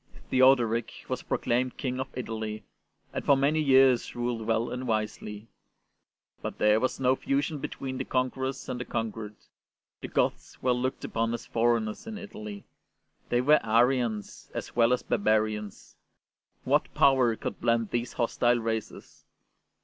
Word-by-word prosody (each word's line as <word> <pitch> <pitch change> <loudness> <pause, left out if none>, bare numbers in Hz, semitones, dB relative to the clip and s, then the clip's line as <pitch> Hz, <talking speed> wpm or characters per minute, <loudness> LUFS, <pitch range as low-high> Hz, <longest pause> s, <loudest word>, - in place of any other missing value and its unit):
Theodoric 125 -3 +4 0.2
was - - -2
proclaimed 125 +1 -1
King 130 -2 -3
of 130 - -2
Italy, 110 -3 -4 0.5
and - - -3
for 140 - +5
many 145 +3 +2
years 135 -3 +4
ruled 120 -2 -2
well 115 +1 +1
and 125 +1 -4
wisely; 105 -1 -3 0.9
but - - -5
there 105 +1 +4
was 130 - -1
no 130 0 +3
fusion 140 +3 -1
between 130 -1 -5
the - - -1
conquerors 130 +1 -2
and 125 - -4
the 125 - -4
conquered. 110 -2 -4 0.7
The - - -5
Goths - - -1
were 125 -1 +2
looked 125 +1 -2
upon 115 +1 -1
as 120 - -8
foreigners 115 - 0
in 220 -1 -5
Italy; 105 - -8 0.7
they 120 - +2
were 150 +4 +4
Arians 115 -2 +1
as - - -5
well 115 0 +4
as 125 - +1
barbarians. 105 -1 -1 0.7
What - - +1
power 130 -4 +4
could - - -6
blend 115 -2 +1
these 120 0 -2
hostile 120 0 +2
races 110 -1 -5
120 Hz, 145 wpm, -28 LUFS, 110-130 Hz, 0.9 s, for